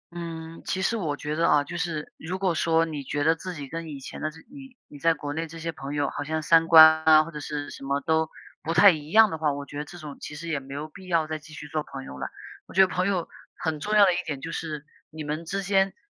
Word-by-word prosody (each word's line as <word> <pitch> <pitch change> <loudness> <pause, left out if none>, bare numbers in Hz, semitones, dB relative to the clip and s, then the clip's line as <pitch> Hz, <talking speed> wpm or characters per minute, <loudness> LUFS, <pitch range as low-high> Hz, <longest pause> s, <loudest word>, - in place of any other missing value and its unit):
嗯， 165 -1 -7
其 190 +2 -2
实 230 - +1
我 160 -9 -2
觉 150 +1 -4
得 165 +1 +2
啊， 145 -1 +4
就 165 +4 -8
是 165 -3 -3
如 180 +3 -5
果 190 -2 +1
说 165 0 +2
你 150 -3 -5
觉 145 +2 -2
得 160 +2 +4
自 180 +2 -7
己 145 -3 -7
跟 165 +3 -6
以 145 -2 -7
前 135 - -9
的 155 - -1
这 155 - -14
你 270 -2 -13
你 145 - -13
在 165 +2 +3
国 145 -1 -5
内 165 +2 -3
这 165 +1 -10
些 165 +1 -3
朋 140 -2 -7
友 145 -1 +1
好 - - -4
像 155 +1 -2
三 165 +1 +5
观 160 -1 +9
啊， 155 -1 +7
或 165 - -9
者 150 - -7
是 145 0 -5
什 - - -10
么 140 +1 0
都 160 +2 +1 0.3
不 165 +2 -3
太 175 +5 +9
一 150 -3 -6
样 220 +2 +6
的 160 - -4
话， 155 -2 +2
我 140 0 -5
觉 145 0 -7
得 150 - -4
这 175 - -11
种 150 -4 -9
其 150 - -7
实 170 +3 -7
也 155 -3 0
没 135 0 -9
有 150 +2 -4
必 185 +4 -14
要 165 -3 +2
再 155 0 -4
继 155 +1 -16
续 150 - -8
做 155 +1 -2
朋 135 -2 -8
友 65 - -9
了。 - - -3 0.4
我 - - -14
觉 190 - +7
得 190 - +7
朋 185 0 -1
友 185 -4 0 0.3
很 160 -2 -3
重 210 +7 -1
要 205 -1 +8
的 185 - +3
一 - - -1
点 145 -3 -4
就 165 +4 -6
是 150 -3 -5 0.2
你 155 0 -7
们 150 +3 -4
之 195 +4 -3
间， 195 0 +2
160 Hz, 315 characters per minute, -26 LUFS, 150-170 Hz, 0.4 s, 观